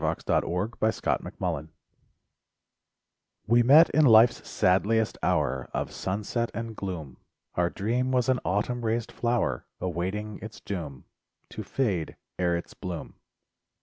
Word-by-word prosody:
SONGS - - -1
AND - - +4
DREAMS 110 +5 -1
My 90 -2 0
Dream 80 0 -6 1.8
We 120 +3 +4
met 145 +8 +7
in 155 +2 +4
life's 115 -1 +6
sadliest 105 +4 +2
hour 65 -2 0
Of - - -2
sunset 105 +5 -2
and 115 -1 -5
gloom; 85 -10 -6 0.4
Our 85 -1 +1
dream 120 +7 -1
was 125 -2 +2
an 130 -1 +2
autumn 110 +6 -1
raised 115 +1 -1
flower, 120 - -1
Awaiting 95 +4 -3
its 110 +1 -9
doom— 75 -10 -6 0.4
To - - -6
fade 100 - -1 0.2
ere 85 -1 +2
its 85 - -8
bloom. 90 -3 -6
105 Hz, 130 wpm, -27 LUFS, 90-120 Hz, 1.8 s, met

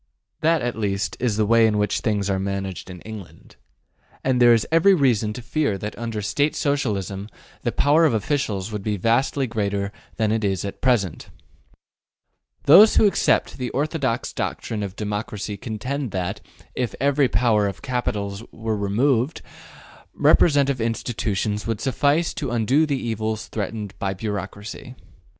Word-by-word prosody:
That 160 -2 +2
at 120 0 -2
least 100 -2 -2
is 115 -4 0
the 110 - +2
way 115 +1 +5
in 105 -1 +1
which 105 -1 +1
things 105 -3 0
are 95 -1 0
managed 95 -1 -4
in 90 -2 -9
England. 110 -4 -11 0.7
And 130 -1 +1
there 120 0 +8
is 115 -2 +4
every 170 +4 +5
reason 120 - +2
to 125 - -8
fear 135 -4 0
that 105 +2 -6
under 115 -3 -4
State 145 +8 0
Socialism 105 - -1 0.3
the - - -1
power 150 +3 +3
of 150 - +3
officials 110 -5 -1
would 105 -1 -4
be 105 +1 -2
vastly 125 +7 +1
greater 100 -4 -2 0.2
than 110 -2 +1
it 110 0 0
is 95 -2 0
at 100 - -7
present. 115 -10 0 1.3
Those 200 +9 +8
who - - +5
accept 200 - +2
the 125 -1 -2
orthodox 140 -4 -1
doctrine 110 -2 -3
of 100 -2 -5
democracy 105 0 -4
contend 125 +6 -4
that, 95 +2 -3 0.3
if 125 -2 -2
ever 140 0 +3
the - - 0
power 105 -1 +2
of 100 - -6
capital 105 -6 -2 0.2
were 110 -1 -3
removed, 120 +7 +1 0.7
representative 140 -5 +4
institutions 110 -2 -2
would 115 -2 -2
suffice 145 +5 +1
to 140 - -4
undo 120 +7 +2
the 140 -2 0
evils 110 -2 -3
threatened 105 -1 -4
by 95 -1 -2
bureaucracy. 105 +5 -6
110 Hz, 155 wpm, -23 LUFS, 100-130 Hz, 1.3 s, there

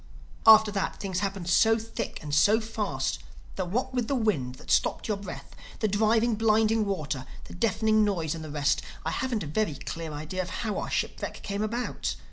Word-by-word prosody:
After 220 -1 +9
that 195 -2 -2
things 190 -2 -2
happened 195 -3 -3
so 225 +5 +5
thick 225 0 -5
and 150 -1 -5
so 205 +9 +5
fast 210 - -2 0.4
that 185 -2 -3
what 250 +6 -1
with 245 -3 0
the 280 - 0
wind 155 - 0
that - - -8
stopped - - +2
your 215 - +1
breath, 200 - -8 0.2
the 215 - +1
driving, 220 +3 +3
blinding 220 0 +3
water, 150 -9 -3 0.2
the - - -11
deafening 215 +2 +2
noise 170 -7 0
and 165 -1 -6
the 155 - -7
rest, 145 -1 +1 0.2
I - - 0
haven't 245 -5 -1
a - - -5
very 155 +2 -1
clear 160 +3 -6
idea 155 +5 -4
of 180 - -5
how 210 +2 -2
our - - -4
shipwreck - - -3
came 200 0 -3
about. 230 +3 -2
205 Hz, 195 wpm, -28 LUFS, 165-220 Hz, 0.4 s, After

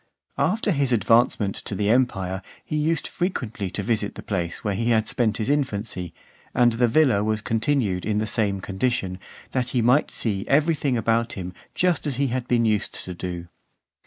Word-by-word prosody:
After 215 -1 +1
his 140 -5 +1
advancement 115 -2 +3
to 100 - -4
the 105 +2 +1
empire, 95 -7 +1 0.2
he 155 - -3
used 150 +1 +1
frequently 120 - -3
to 100 - -4
visit 105 -1 -1
the - - -8
place 90 -3 -3
where 105 - 0
he 115 +5 0
had 110 -2 +3
spent 110 -3 +1
his 110 - -2
infancy; 110 - -1 0.4
and 120 -1 +4
the 120 +1 +3
villa 120 -5 +3
was 110 0 0
continued 115 -5 0
in 105 -1 0
the 110 - +1
same 100 -2 0
condition, 95 -2 -1 0.3
that 125 -2 -1
he - - +4
might 125 +6 +4
see 100 -4 -1
every 155 +4 +4
thing 140 -4 0
about 115 +1 +1
him 90 -1 -6 0.2
just 175 -4 +1
as 140 - -1
he 140 +1 +1
had 125 0 -2
been 120 -1 +2
used 105 -2 0
to 90 - -5
do. 85 -1 -5
115 Hz, 190 wpm, -24 LUFS, 100-130 Hz, 0.4 s, and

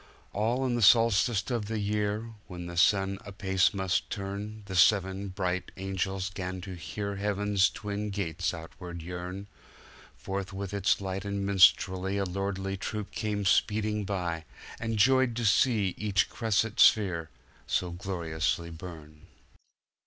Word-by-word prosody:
All 115 +6 0
in 125 - 0
the 120 - 0
solstice 115 0 +4
of 115 -4 -1
the 110 0 -2
year, 105 +2 -1 0.2
When 90 -2 -7
the 85 0 -7
sun 95 +2 +3
apace 95 -1 +1
must 95 -2 -1
turn, 100 +2 -5
The 95 -1 -6
seven 95 +2 +3
bright 90 -1 -2
angels 95 0 -2
'gan 95 0 -4
to 95 0 -7
hear 100 +5 -5
Heaven's 100 -1 +2
twin 105 0 -4
gates 90 -4 -2
outward 85 0 -8
yearn:Forth 95 +2 -8
with 100 0 -5
its 100 0 +2
light 95 0 -3
and 100 -1 -2
minstrelsyA 95 0 +4
lordly 95 0 -2
troop 105 +1 -4
came 105 -3 -2
speeding 105 +2 +2
by, 90 -5 -3 0.3
And 115 -1 -2
joyed 130 +2 +4
to 120 0 -2
see 105 -2 +3
each 100 -3 +1
cresset 110 0 0
sphere 90 -7 +4 0.4
So 90 - 0
gloriously 85 -2 -2
burn. 80 -3 -10
100 Hz, 135 wpm, -29 LUFS, 90-105 Hz, 0.4 s, solstice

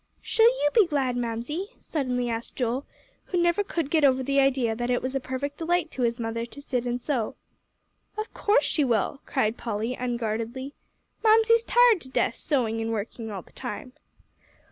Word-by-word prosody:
"Shall 450 0 +4
you 475 -12 +3
be 430 -6 +5
glad, 270 -5 0
Mamsie?" 245 - -3
suddenly 250 -5 -2
asked 230 0 -4
Joel, 250 +2 -1 0.4
who 360 - -1
never 345 +3 +3
could 330 -7 -3
get 315 -2 +3
over 260 -2 +4
the 275 +2 +2
idea 260 -4 +2
that 240 +1 -3
it 245 - +2
was 260 +1 -4
a 270 - 0
perfect 270 +3 -4
delight 335 0 0
to 260 - -5
his 235 0 +1
mother 230 0 -2
to 235 +4 -9
sit 250 -3 -2
and 245 0 -1
sew. 245 -5 -2 0.8
"Of 430 +1 -4
course 420 +4 +3
she 300 - +2
will," 240 +2 0
cried 225 -4 0
Polly, 225 +1 -2
unguardedly. 240 +2 -3 0.5
"Mamsie's 450 +1 +5
tired 480 -6 +5
to 260 - -6
death - - +1
sewing 230 -6 -1
and 225 0 -2
working 225 +1 -4
all 195 -4 -6
the - - -22
time." 255 0 -6
260 Hz, 185 wpm, -26 LUFS, 235-310 Hz, 0.8 s, be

